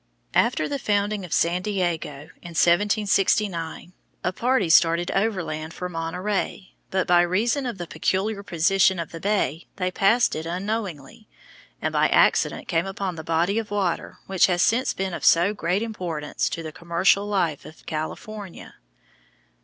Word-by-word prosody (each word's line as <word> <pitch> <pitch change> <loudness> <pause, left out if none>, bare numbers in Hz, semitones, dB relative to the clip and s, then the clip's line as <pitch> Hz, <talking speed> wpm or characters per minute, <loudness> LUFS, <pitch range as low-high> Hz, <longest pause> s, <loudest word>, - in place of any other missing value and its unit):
After 155 - +2
the 280 - -3
founding 205 -2 0
of 175 - -9
San 175 +2 +2
Diego, 170 -6 -3
in 170 -1 -10
1769, 195 -1 +1 0.3
a 180 - 0
party 245 -2 +1
started 170 +1 +4
overland 175 -7 -2
for 180 - -4
Monterey, 180 +3 -3 0.2
but 190 -1 0
by 175 0 +5
reason 225 +10 +1
of 235 - -4
the 175 - -5
peculiar 190 +6 -1
position 190 +1 +2
of 170 -2 -5
the 165 - -7
bay 175 -5 -1
they 185 -1 -1
passed 220 +6 +3
it 160 +1 -4
unknowingly, 190 -1 -4 0.6
and - - -1
by - - +3
accident - - +2
came 170 +1 0
upon 195 -1 -3
the 160 - -7
body 170 +6 +1
of 220 - -6
water 200 -4 -2
which 190 -2 +3
has 175 -1 +2
since 250 +4 +2
been 190 -1 -3
of - - -5
so 175 +5 +5
great 195 +1 -1
importance 175 -9 -3
to 165 - -5
the 155 - -6
commercial 175 +4 +1
life 175 -8 0
of 155 - -14
California. 195 +5 -6
185 Hz, 155 wpm, -24 LUFS, 165-205 Hz, 0.6 s, by